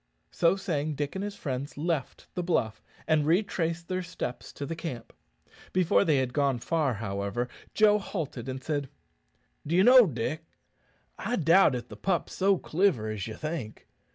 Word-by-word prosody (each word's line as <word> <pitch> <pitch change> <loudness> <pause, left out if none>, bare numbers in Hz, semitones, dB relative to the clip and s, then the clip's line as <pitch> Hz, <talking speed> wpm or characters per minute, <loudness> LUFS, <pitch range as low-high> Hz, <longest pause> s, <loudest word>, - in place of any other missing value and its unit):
So 170 +2 +3
saying, 155 -6 -2
Dick 145 0 -3
and 190 - -3
his 205 0 -4
friends 140 -6 -4
left 155 -3 -2
the 180 - -2
bluff, 140 -11 0 0.3
and 155 -2 +3
retraced 170 -1 0
their 185 0 -1
steps 175 -8 -6
to 145 - -5
the 165 - -4
camp. 155 -9 -6 0.6
Before 165 - +4
they 150 -3 +3
had 130 -2 0
gone 140 -3 +2
far, 140 0 0
however, 100 +2 -3 0.3
Joe 210 -1 +5
halted, 145 - -5
and 130 0 -5
said, 145 -4 -2 0.8
"D'ye 175 +5 +4
know, 250 -1 +8
Dick, 135 +3 -3 0.8
I 245 - -1
doubt 165 - +5
if 120 -1 -5
the - - -10
pup's 190 -3 -1
so 195 0 +3
cliver 160 - +1
as 105 -1 -4
ye 110 - -6
think. 155 -9 -5
155 Hz, 165 wpm, -28 LUFS, 130-180 Hz, 0.8 s, know